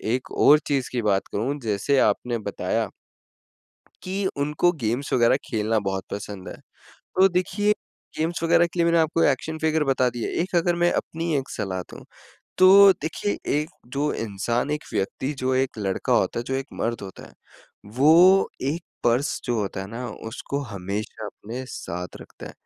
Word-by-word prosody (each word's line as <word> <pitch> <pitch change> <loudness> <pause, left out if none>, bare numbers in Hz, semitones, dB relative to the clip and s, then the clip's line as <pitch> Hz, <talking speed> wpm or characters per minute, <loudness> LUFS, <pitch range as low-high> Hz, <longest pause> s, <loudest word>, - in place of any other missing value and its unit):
एक 130 - -6
और 150 +1 +7
चीज़ 135 -3 0
की 125 - -1
बात 100 -3 +1
करूँ 135 +8 -1
जैसे 110 +5 0
आपने 120 -1 +1
बताया - - -1 1.1
कि 190 +2 -2
उनको 150 +5 +2
गेम्स 120 +5 -1
वग़ैरह 120 +1 +4
खेलना 110 -2 0
बहुत 95 0 -3
पसंद 100 -2 -6
है, - - -8 0.6
तो 190 +1 +6
देखिए 195 +3 +1 0.4
गेम्स 165 +2 -2
वगैरह 170 +1 +4
के 170 - -9
लिए 170 - +4
मैंने 170 0 +3
आपको 160 +1 +2
एक्शन 155 +4 0
फ़िगर 160 -1 +1
बता 130 -2 +2
दिए। 120 -1 -4
एक 185 - -6
अगर 175 +1 +2
मैं 175 0 +3
अपनी 165 -1 -2
एक 135 0 -3
सलाह 95 -3 -3
दूँ, - - -11 0.5
तो 195 +1 +9
देखिए 165 +6 -2 0.2
एक 150 +3 -2 0.2
जो 145 +2 0
इंसान, 115 +5 -2
एक 150 0 -2
व्यक्ति, 130 +8 -2
जो 130 -1 -1
एक 130 -3 0
लड़का 95 -2 -1
होता - - +1
है, 120 - -6
जो 135 - -1
एक 135 0 -2
मर्द 115 +1 -1
होता 95 -2 -9
है, - - -17 0.6
वो 175 +7 +6
एक 155 +6 -1 0.2
पर्स 120 +4 +1
जो 120 - -1
होता 95 -1 -3
है 95 - -5
ना 120 +2 -5 0.2
उसको 135 +4 -4
हमेशा 105 0 -5
अपने 115 +5 -7
साथ 90 -3 -6
रखता - - -12
है - - -9
135 Hz, 175 wpm, -24 LUFS, 110-165 Hz, 1.1 s, तो